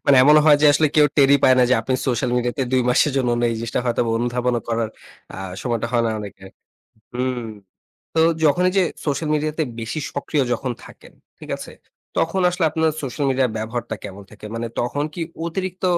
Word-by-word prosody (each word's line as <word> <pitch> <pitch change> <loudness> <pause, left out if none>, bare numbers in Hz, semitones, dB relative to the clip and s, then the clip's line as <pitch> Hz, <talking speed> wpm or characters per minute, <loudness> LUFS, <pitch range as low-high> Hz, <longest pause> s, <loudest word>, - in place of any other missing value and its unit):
মানে 140 - +6
এমনও 150 +3 +7
হয় 150 -1 +7
যে, - - +7
আসলে 155 +2 +3
কেউ 150 -1 +7
টেরই 140 -1 +6
পায় 130 - +6
না 125 - +6
যে, - - +6
আপনি 130 +3 -1
সোশ্যাল 125 0 0
মিডিয়াতে 125 +3 -1
২ 130 -1 +3
মাসের 135 +3 +3
জন্য 130 -3 +1
নেই। 120 - +2
এই 115 - -4
জিনিসটা 115 +2 -2
হয়তো 120 -1 0 0.2
অনুধাবনও 120 0 0
করার 115 -1 0 0.5
আ - - -8 0.3
সময়টা 120 -2 -1
হয় 120 - +2
না - - 0
অনেকের। 95 -2 -9 0.6
হুম। 125 0 -1 0.8
তো 160 - +4 0.2
যখন 155 +4 +3
এই 185 - -6
যে, 190 - +5 0.2
সোশ্যাল 150 +1 -1
মিডিয়াতে 155 +1 -1 0.2
বেশি 115 +7 -4
সক্রিয় 140 0 -1
যখন 125 +1 -3
থাকেন, - - -15 0.3
ঠিক - - -11
আছে? - - -9 0.5
তখন 175 +4 +1
আসলে 180 -2 0
আপনার 160 0 +1
সোশ্যাল 140 +2 -3
মিডিয়া 130 -1 +2
ব্যবহারটা 115 +1 -4
কেমন 100 0 -8
থাকে? 105 0 -12
মানে 115 0 -3
তখন 135 +4 -1
কি 170 - -6 0.2
অতিরিক্ত 185 +2 -4
130 Hz, 195 wpm, -21 LUFS, 120-150 Hz, 0.8 s, এমনও